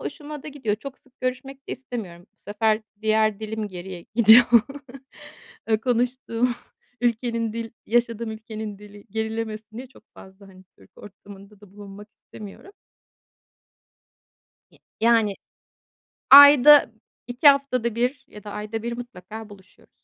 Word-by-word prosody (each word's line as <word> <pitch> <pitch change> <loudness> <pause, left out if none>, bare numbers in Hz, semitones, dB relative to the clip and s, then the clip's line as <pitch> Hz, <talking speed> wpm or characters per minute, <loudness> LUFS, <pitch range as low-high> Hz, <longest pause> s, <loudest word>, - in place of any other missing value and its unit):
Hoşuma 295 -2 -8
da - - -9
gidiyor. 260 -8 -3
Çok 275 +4 -10
sık 260 -1 -30
görüşmek 265 +2 -6
de - - -4
istemiyorum. 210 -9 -8
Bu - - -53
sefer 215 +1 -1 0.2
diğer 215 -1 +1
dilim 220 -1 -5
geriye 180 -1 -9
gidiyor. 230 +1 +7 1.3
Iıı, 220 -1 +2
konuştuğum 245 0 -1 0.5
ülkenin 230 -1 -1
dil 230 -1 -6
yaşadığım 230 -1 -1
ülkenin 220 -1 -8
dili 205 0 -15
gerilemesin 220 0 -5
diye 255 +2 -8
çok 250 - -21
fazla, 190 +1 -16
hani, 185 -1 -17
Türk 95 -1 -22
ortamında 200 0 -15
da 205 -3 -18
bulunmak 205 0 -12
istemiyorum. 215 - -13 2.0
Ya - - -24 0.2
yani, 225 -3 +2 1.0
ayda, 285 -2 +8 0.3
2 245 +4 -2
haftada 255 -5 +1
1 250 +4 -2
ya 210 - -14
da 205 - -8
ayda 215 +1 -6
1 235 0 -5
mutlaka 220 -2 -10
buluşuyoruz. 200 -2 -19
220 Hz, 130 wpm, -23 LUFS, 210-245 Hz, 2.0 s, ayda